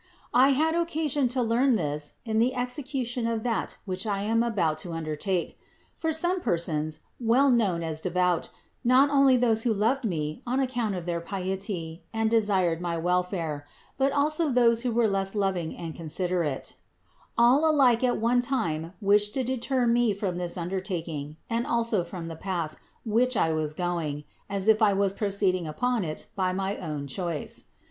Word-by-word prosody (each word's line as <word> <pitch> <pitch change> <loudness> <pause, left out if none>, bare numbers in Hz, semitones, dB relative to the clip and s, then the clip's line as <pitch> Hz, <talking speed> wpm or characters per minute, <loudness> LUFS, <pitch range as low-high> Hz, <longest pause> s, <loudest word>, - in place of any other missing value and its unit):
I 255 +3 +6
had 315 +4 +2
occasion 310 -5 0
to 250 +1 0
learn 240 +3 +3
this 150 -5 -2
in 220 -1 0
the 250 +3 +2
execution 250 -1 -2
of 225 -1 -1
that 235 -2 -2
which 190 +2 -3
I 200 -1 -1
am 225 +2 +2
about 180 -10 0
to 170 +1 -5
undertake: 165 +3 -2 0.4
for 320 -1 -1
some 350 +4 +1
persons, 155 - -1 0.2
well 255 +4 +4
known 195 -8 +2
as 160 -1 -3
devout, 180 -1 +1 0.3
not 260 +4 +5
only 275 -2 +5
those 230 -3 +2
who 235 - +1
loved 225 +6 +1
me 155 -7 -2
on 255 +2 +1
account 245 -6 -1
of 175 -2 -5
their 170 -1 -2
piety 185 -2 -4
and 225 0 0
desired 190 -7 +2
my 170 -1 -2
welfare, 170 -4 -1 0.3
but 270 +1 +3
also 305 +3 +2
those 235 -2 +3
who 250 -1 -1
were 230 0 +3
less 195 0 -1
loving 190 -5 -1
and 165 -2 -6
considerate: 170 -2 -2 0.6
all 255 +7 +5
alike 260 -6 +4
at 250 -1 +2
one 240 +2 +2
time 170 - -2
wished 205 +1 +3
to 265 - 0
deter 255 0 0
me 235 -3 +3
from 185 -3 -2
this 175 0 -2
undertaking, 170 -5 -4
and 230 +1 -1
also 230 -5 +1
from 170 0 -7
the 165 - -6
path, 170 -3 -3 0.3
which 235 +2 +2
I 160 -3 +2
was 155 -1 -2
going, 165 -5 -2 0.3
as 195 0 -3
if 220 0 +5
I 210 -2 +5
was 195 0 +1
proceeding 195 -4 0
upon 240 +8 0
it 155 -2 -4
by 185 -2 0
my 195 +1 -2
own 150 -4 -5
6 130 - -7
INTRODUCTION - - -7 0.3
choice. - - -6
205 Hz, 175 wpm, -27 LUFS, 170-245 Hz, 0.6 s, I